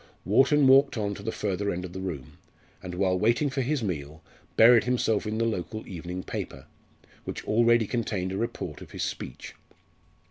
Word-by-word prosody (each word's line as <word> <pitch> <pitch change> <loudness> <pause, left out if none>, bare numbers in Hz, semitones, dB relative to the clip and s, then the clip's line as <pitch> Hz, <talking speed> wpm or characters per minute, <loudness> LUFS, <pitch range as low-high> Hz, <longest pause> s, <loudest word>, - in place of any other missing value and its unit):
Wharton 135 - +4
walked 135 0 +5
on 100 -2 -1
to 100 - -9
the 110 +2 -3
further 100 -1 -2
end 90 -1 -3
of 90 - -9
the 95 - -5
room, 75 -6 -6 0.4
and, 90 -1 -7
while 90 0 +1
waiting 120 +7 +2
for 135 +1 -1
his 135 0 -1
meal, 80 -4 -5 0.3
buried 115 0 +7
himself 115 -4 +1
in 110 +1 -2
the 115 - +1
local 110 0 -3
evening 90 +1 -6
paper, - - -6 0.6
which - - -6
already 115 +1 +4
contained 105 -5 -2
a 95 - -3
report 115 +3 -4
of - - -11
his - - -3
speech. - - -6
105 Hz, 180 wpm, -27 LUFS, 90-120 Hz, 0.6 s, buried